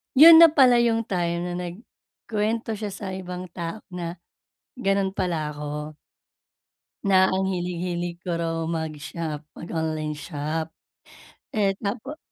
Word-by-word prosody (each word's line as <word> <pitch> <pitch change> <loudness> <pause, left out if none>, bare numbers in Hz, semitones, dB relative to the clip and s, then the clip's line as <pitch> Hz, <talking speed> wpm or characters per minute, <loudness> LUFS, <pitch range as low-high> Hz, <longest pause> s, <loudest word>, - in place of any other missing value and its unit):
yun 325 +4 +11
na 335 - +11
pala 260 -6 +5
'yung 230 -1 +2
time 170 -3 -1
na - - -3
nag-kwento 215 +4 -4
siya 210 -2 -4
sa 195 -1 -6
ibang 180 -1 -6
tao 170 +5 -5
na 175 -1 -4 0.6
ganun 195 -3 +1
pala 170 -6 -2
ako. 150 +1 -6 1.1
Na 190 -1 +5
ang 190 0 +1
hilig-hilig 175 -1 -3
ko 175 -3 -2
raw 165 -1 -2
mag-shop, 160 -1 -4 0.2
mag-online 160 -2 -3
shop. 155 +1 -4 0.9
Eh 200 -3 +2
tapos 225 +8 -4
180 Hz, 120 wpm, -25 LUFS, 165-205 Hz, 1.1 s, yun